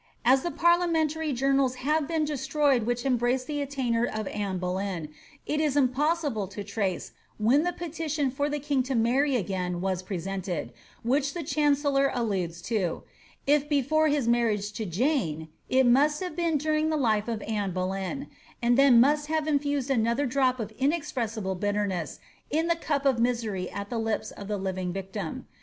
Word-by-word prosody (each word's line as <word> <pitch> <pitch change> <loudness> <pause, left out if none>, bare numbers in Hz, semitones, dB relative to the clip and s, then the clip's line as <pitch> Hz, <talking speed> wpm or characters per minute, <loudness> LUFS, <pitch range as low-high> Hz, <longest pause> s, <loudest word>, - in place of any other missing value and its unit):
As 260 +2 +5
the 345 - -2
parliamentary 325 -3 +2
journals 270 0 +2
have 295 +3 0
been 320 -2 0
destroyed 280 -4 +1
which 245 +1 -1
embrace 250 0 +1
the 290 +2 -3
attainder 260 -5 0
of 215 -3 -2
Anne 200 -3 -2
Boleyn, 180 -3 -3 0.4
it 300 +1 0
is 295 -2 +1
impossible 280 - +1
to 200 +2 -7
trace 200 -2 -2 0.3
when 235 +7 +4
the 355 +2 0
petition 315 -5 -2
for 285 +3 -1
the 295 - -1
king 285 -2 0
to 260 +1 -2
marry 255 +5 +2
again 180 -4 -2
was 185 0 -1
presented, 185 - -4 0.3
which 275 +5 +1
the 345 - -3
chancellor 285 -2 +2
alludes 185 -8 -2
to; 195 -7 -1 0.4
if 295 +1 +2
before 305 +2 +2
his 290 -5 +1
marriage 220 -4 +1
to 215 0 -4
Jane, 170 - 0 0.2
it 260 0 +4
must 285 +5 +4
have 360 -4 -5
been 335 -2 +1
during 310 +1 +1
the 310 - +1
life 220 -6 +1
of 225 -2 -3
Anne 210 -3 -1
Boleyn, 190 +8 -3 0.3
and 240 +2 +3
then 270 -4 +7
must 295 +4 +3
have 315 0 0
infused 285 -2 0
another 235 +3 +2
drop 255 0 +1
of 220 -1 -4
inexpressible 250 - -1
bitter 205 +2 0
ness 175 -7 -4 0.3
in 315 +3 +1
the 335 0 +2
cup 290 -4 -2
of 265 -4 +3
misery 225 -6 0
at 200 0 -6
the 235 - -1
lips 225 -1 -2
of 200 - -9
the 210 0 -1
living 185 -2 -3
victim. 190 -2 -5
255 Hz, 175 wpm, -27 LUFS, 205-290 Hz, 0.4 s, then